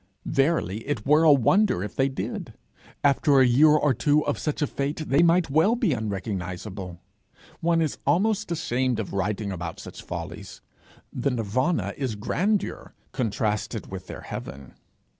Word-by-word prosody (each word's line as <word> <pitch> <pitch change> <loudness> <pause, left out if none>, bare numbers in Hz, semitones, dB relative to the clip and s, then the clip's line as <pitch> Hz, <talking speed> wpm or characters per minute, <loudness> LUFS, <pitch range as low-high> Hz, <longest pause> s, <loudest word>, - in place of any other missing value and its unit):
Verily 135 - +1
it 135 -8 -2
were 150 +3 +5
a 160 -2 +7
wonder 145 - +3
if 105 - -6
they 135 0 +2
did! 135 - -5 0.5
After 140 0 +4
a 130 - +6
year 130 +6 +5
or 150 -2 +4
two 145 +5 +2
of - - -1
such 150 0 -2
a - - +3
fate, 145 +3 -3
they 140 +4 +4
might 170 -2 +3
well 160 - +4
be 225 - +1
unrecognizable! 95 -4 -5 0.6
One 165 0 +2
is 155 - -3
almost 205 +7 +1
ashamed 130 -7 0
of 105 - -4
writing 100 +1 -2
about 85 -3 -5
such - - -9
follies. - - -7 0.5
The 130 +2 0
nirvana 125 - -1
is 130 -6 -2
grandeur 190 - -2 0.2
contrasted 110 -2 -2
with 95 -1 -7
their - - -8
heaven. 65 -1 -8
135 Hz, 155 wpm, -25 LUFS, 105-155 Hz, 0.6 s, a